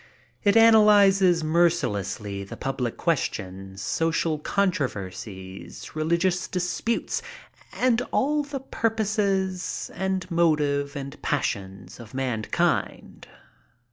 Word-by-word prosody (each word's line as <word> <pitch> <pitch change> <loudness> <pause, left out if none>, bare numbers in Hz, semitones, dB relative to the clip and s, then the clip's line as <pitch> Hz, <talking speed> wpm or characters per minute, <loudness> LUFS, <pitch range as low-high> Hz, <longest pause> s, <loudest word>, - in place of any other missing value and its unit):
It 205 +2 +4
analyzes 200 -6 +6
mercilessly 105 - 0
the 100 - -9
public 130 -3 -3
questions, 95 - -2
social 165 -1 0
contro 185 -3 +1
versies, 95 -1 -9
religious 170 +4 0
dilutes 190 - -1 0.5
and 245 -1 +2
all 295 +3 +2
of 290 -1 -3
the 275 -2 -4
purpose 205 -6 -1
and 190 0 -3
motive 150 -4 +1
and 140 -1 -7
passions 95 +2 -3
of 115 0 -11
mankind. 125 -5 -1
170 Hz, 95 wpm, -25 LUFS, 120-195 Hz, 0.5 s, analyzes